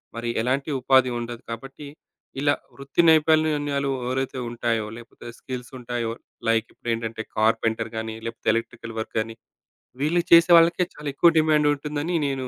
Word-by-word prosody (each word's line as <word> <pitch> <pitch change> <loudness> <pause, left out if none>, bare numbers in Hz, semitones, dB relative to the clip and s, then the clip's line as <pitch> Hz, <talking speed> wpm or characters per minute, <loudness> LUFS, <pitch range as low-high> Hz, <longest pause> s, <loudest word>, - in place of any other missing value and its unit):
మరి 115 0 -3
ఎలాంటి 130 +5 -1
ఉపాధి 130 0 +4
ఉండదు 120 0 -6
కాబట్టి, 135 +5 -8 0.5
ఇలా 145 0 +3 0.2
వృత్తి 140 +4 0
నైపుణ్యాలు 150 -3 +2 0.2
ఎవరైతే 130 0 -2
ఉంటాయో? 115 -2 -1
లేకపోతే 120 0 -13
స్కిల్సుంటాయో? 120 -2 -5 0.4
లైక్ 115 0 +2
ఇప్పుడేంటంటే, 115 -1 -4
కార్పెంటర్ 110 0 +1
గానీ, 110 0 -4
లేకపోతే 115 0 -3
ఎలక్ట్రికల్ 115 0 -5
వర్కనీ, 110 0 -3 0.7
వీళ్ళు 170 +4 +2
చేసేవాళ్లకే 170 +1 +6
చాలా 150 0 -8
ఎక్కువ 170 +4 +5
డిమాండుంటుందని, 150 +1 +1
నేను 135 -2 -3
130 Hz, 120 wpm, -24 LUFS, 115-150 Hz, 0.7 s, చేసేవాళ్లకే